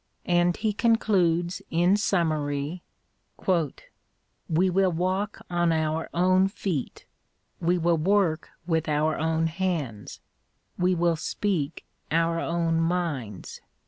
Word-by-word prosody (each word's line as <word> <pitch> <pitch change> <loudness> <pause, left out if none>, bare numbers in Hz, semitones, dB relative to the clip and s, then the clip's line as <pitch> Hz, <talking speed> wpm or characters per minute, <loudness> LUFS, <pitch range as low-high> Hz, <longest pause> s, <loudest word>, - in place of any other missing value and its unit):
And 175 0 +2
he 215 -1 0
concludes 185 -7 +2
in 175 +4 +3
summary: 155 -5 -1 0.6
We 170 +1 -2
will 185 0 +2
walk 185 +5 -2
on 175 -1 +1
our 160 0 -1
own 185 +2 +3
feet: 185 -8 -4 0.5
we 175 +1 +2
will 170 -1 +2
work 175 -2 +1 0.2
with 160 -2 0
our 155 +1 +1
own 160 +1 +1
hands: 160 - -3 0.6
we 180 0 +2
will 170 -1 +2
speak 165 -4 -2 0.2
our 165 +1 +1
own 165 -1 0
minds. 160 - -3
170 Hz, 110 wpm, -26 LUFS, 160-185 Hz, 0.6 s, in